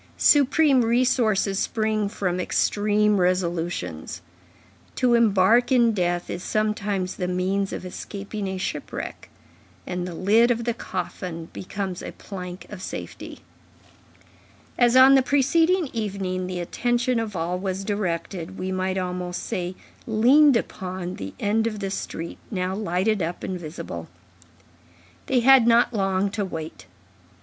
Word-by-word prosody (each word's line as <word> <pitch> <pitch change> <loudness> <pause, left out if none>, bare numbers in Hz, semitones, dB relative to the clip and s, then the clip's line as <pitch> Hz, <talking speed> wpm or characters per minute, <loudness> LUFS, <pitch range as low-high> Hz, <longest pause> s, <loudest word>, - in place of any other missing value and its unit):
Supreme 285 -2 +5
resources 225 -4 +2
spring 215 -2 0
from 180 -3 -2
extreme 210 +2 +2
resolutions. 175 - -2 0.7
To 250 -2 +2
embark 230 +2 +4
in 240 -3 +5
death 175 -3 -1
is 175 - -5
sometimes 205 -3 -1
the 180 - -2
means 190 +2 -1
of - - -6
escaping 200 +2 -6
a 190 0 -3
shipwreck; 185 - -5 0.6
and 180 0 -3
the 175 - -6
lid 220 +7 +4
of 235 -1 0
the 235 0 0
coffin 180 -5 -5
becomes 190 -1 -5
a - - -7
plank 180 -2 -8
of 205 -3 -8
safety. - - -7 1.3
As 240 0 +3
on 260 +1 +8
the 270 - +6
preceding 320 +6 +2
evening, 190 -4 -3
the 180 -1 -4
attention 240 +6 0
of 220 -3 -4
all 175 +2 -2
was 190 0 -3
directed, 190 -2 -3
we 185 0 -3
might 185 0 -1
almost 180 -1 -3
say 180 0 -3 0.3
leaned 255 +5 +5
upon, 185 -4 -5
the 95 0 -7
end 220 +2 +1
of 215 -2 -4
the 195 -1 -3
street, 170 -3 -5
now 185 -2 -2
lighted 200 +1 0
up 170 +1 -3
and 185 -1 -3
visible. 160 0 -7 1.2
They 255 -2 +2
had 260 -1 +6
not 235 +1 +4
long 195 -1 0
to 205 0 -2
wait. 160 -4 -7
195 Hz, 135 wpm, -24 LUFS, 180-230 Hz, 1.3 s, on